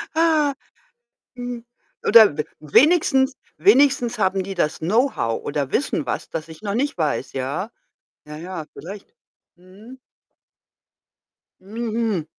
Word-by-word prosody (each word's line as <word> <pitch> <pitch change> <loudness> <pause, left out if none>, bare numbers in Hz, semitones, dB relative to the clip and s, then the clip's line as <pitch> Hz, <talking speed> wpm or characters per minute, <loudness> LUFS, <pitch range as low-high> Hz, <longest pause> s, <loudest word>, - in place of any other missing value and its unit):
Ha! 315 -4 +2 0.8
Hm, 245 -1 -6 0.4
oder, 215 -10 +7
w 150 - 0 0.2
wenigstens 265 - +3 0.2
wenigstens 270 - +4
haben 190 -1 +1
die 195 +1 -6
das 155 -3 -1
Know-how 185 - 0
oder 140 -2 -3
wissen 145 0 0
was, - - -3
das 160 0 -5
ich 160 +2 -13
noch 200 -1 -3
nicht 275 -4 -1
weiß, 150 -4 -1
ja. 140 - -3 0.6
Ja, 150 - -9
ja, 170 0 -6
vielleicht. 200 +4 -10 0.4
Mhm. 200 +8 -15 1.6
Mhm. 220 -3 -3
205 Hz, 115 wpm, -22 LUFS, 160-250 Hz, 1.6 s, oder